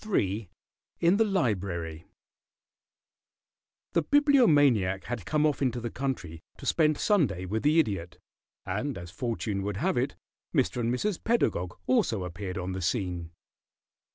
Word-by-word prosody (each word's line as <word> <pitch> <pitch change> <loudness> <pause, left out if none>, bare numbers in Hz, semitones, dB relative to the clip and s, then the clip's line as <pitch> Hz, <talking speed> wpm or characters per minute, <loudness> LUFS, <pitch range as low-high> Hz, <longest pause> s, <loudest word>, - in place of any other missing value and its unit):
III 100 - 0 0.5
IN 175 +4 +4
THE 225 - +5
LIBRARY 95 - -1 1.9
The 170 - +3
Bibliomaniac 145 - +4
had 115 -4 -5
come 150 0 +2
off 150 -2 +1
into 125 -3 +1
the 120 -1 -4
country 110 -12 -4 0.2
to - - -10
spend 155 -2 +3
Sunday 125 - +1
with 110 +4 -2
the 150 +2 +3
Idiot, 95 - -1 0.5
and, 110 +7 -2
as 85 -1 -8
fortune 110 -2 -2
would 100 0 -3
have - - 0
it, - - 0 0.4
Mr. - - +2
and 120 -1 0
Mrs. 185 +10 -1
Pedagog 90 - 0
also 195 - +2
appeared 90 +1 -5
on 90 0 -3
the 95 0 -4
scene. 90 -4 -2
110 Hz, 140 wpm, -28 LUFS, 95-150 Hz, 1.9 s, THE